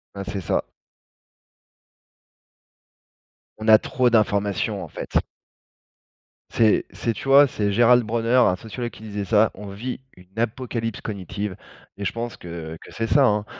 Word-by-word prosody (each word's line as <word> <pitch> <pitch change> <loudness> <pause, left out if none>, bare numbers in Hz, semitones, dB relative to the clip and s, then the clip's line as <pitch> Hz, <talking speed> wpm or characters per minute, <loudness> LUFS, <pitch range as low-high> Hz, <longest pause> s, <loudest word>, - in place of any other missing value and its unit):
Bah, 100 - -5
c'est 100 0 -4
ça. 85 - -1 2.9
On 110 +1 -2
a 110 - +10
trop 125 +3 +1
d'informations, 105 -3 +1
en - - -9
fait. - - -3 1.3
C'est 110 -2 +3
c'est 115 - -2
tu 135 - -8
vois? 140 +1 +7
C'est 105 -4 -1
Gérald 120 +3 +5
Bronner, 115 +2 0
un 105 -7 +5
sociologue 120 +4 -6
qui 110 - -14
disait 105 -2 -4
ça: 105 +2 +3
«On 105 +1 -9
vit 120 +7 -5 0.2
une 90 +3 -20
apocalypse 115 -1 -2
cognitive», 100 -1 -5 0.4
et 100 - -5
je - - 0
pense 115 0 -5
que 85 -2 -7
que - - -13
c'est 115 0 -2
ça, 140 +2 +4
hein 105 -3 +1
110 Hz, 150 wpm, -23 LUFS, 100-120 Hz, 2.9 s, a